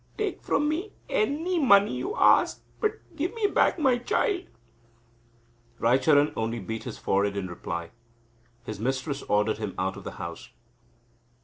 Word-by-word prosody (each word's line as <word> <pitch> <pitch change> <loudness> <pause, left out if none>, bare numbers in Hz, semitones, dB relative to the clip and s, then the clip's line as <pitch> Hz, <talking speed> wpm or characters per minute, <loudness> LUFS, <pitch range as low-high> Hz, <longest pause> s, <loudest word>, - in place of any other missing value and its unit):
Take 425 -2 -2
from 295 - +1
me 340 +8 -2 0.2
any 360 -6 0
money 205 -7 +5
you 415 +4 -3
ask, - - +4 0.2
but 430 0 -3
give 345 +9 -2
me 450 -2 0
back 405 - +3
my 265 -6 +3
child!" 400 - 0 1.3
Raicharan 140 +5 +4
only 115 +1 -2
beat 110 +1 -5
his - - -6
forehead 100 +1 0
in 100 - -2
reply. 85 -1 -5 0.7
His 110 -4 -6
mistress 135 +4 -2
ordered 105 +1 +1
him 105 -4 -4
out 95 +1 -1
of - - -9
the - - -6
house. - - -7
145 Hz, 145 wpm, -27 LUFS, -, 1.3 s, money